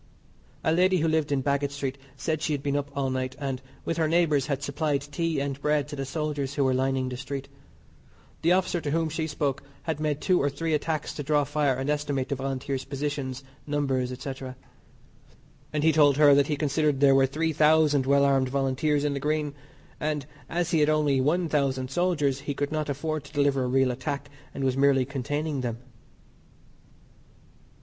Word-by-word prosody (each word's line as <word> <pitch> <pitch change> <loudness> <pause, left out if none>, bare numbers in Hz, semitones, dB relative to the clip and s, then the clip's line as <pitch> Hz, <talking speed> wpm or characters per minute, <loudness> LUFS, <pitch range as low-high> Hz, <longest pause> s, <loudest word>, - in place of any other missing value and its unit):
A - - +2
lady 185 +3 +4
who 165 -1 +1
lived 155 -2 +1
in 135 -2 +1
Baggot 140 0 +1
Street 140 -1 -3 0.2
said 155 -2 -2
she 155 - 0
had 140 -1 -3
been 140 -1 0
up 145 0 -1
all 135 -1 0
night, 130 0 -2
and, 135 -3 -3 0.2
with 165 - -1
her 160 -1 +2
neighbours, 155 -4 +2
had 140 -1 -2
supplied 145 0 0
tea 160 +1 -2
and 140 0 -3
bread 150 -1 +1
to - - -5
the 135 -1 -3
soldiers 145 -1 -3
who 140 - +2
were 130 -1 +2
lining 130 0 0
the 125 -1 -4
street. 135 +1 -5 0.9
The 170 - +3
officer 180 -2 +1
to 145 - -3
whom 165 +2 +1
she 160 +1 -2
spoke 145 -3 -1 0.2
had 160 -3 -2
made 150 -2 -1
two 185 +1 +2
or 145 - +2
three 160 +3 -2
attacks 155 0 -1
to - - -5
draw 145 0 +2
fire 145 -1 +1
and 135 +2 -3
estimate 145 -3 -1
the 140 - 0
Volunteers' 135 0 -3
positions, 140 -1 -4 0.2
numbers, 135 -4 0
&c., 135 - -4 1.4
and 150 -1 -1
he 160 - +5
told 145 -3 +5
her 145 -1 +7
that 140 0 +4
he 150 - 0
considered 150 -1 +1
there 140 -1 +6
were 135 0 +5
3,000 155 -1 +3
well 140 0 +4
armed 135 -2 +2
Volunteers 140 +2 +1
in 145 - +1
the 140 - -2
Green, 150 0 -1 0.5
and 150 -2 -2 0.2
as 170 0 -1
he 165 - +3
had 150 0 +4
only 150 -3 +2
1,000 140 -4 0
soldiers, 150 -6 +1
he 145 0 -4
could 145 +1 -2
not 155 -1 -2
afford 155 +2 -2
to - - -14
deliver 140 -2 +2
a - - -1
real 130 0 +3
attack, 140 +3 -4 0.2
and 140 - -5
was 130 -1 +1
merely 135 -1 +4
containing 145 +2 -2
them. 120 -2 -3
145 Hz, 195 wpm, -27 LUFS, 135-155 Hz, 1.4 s, her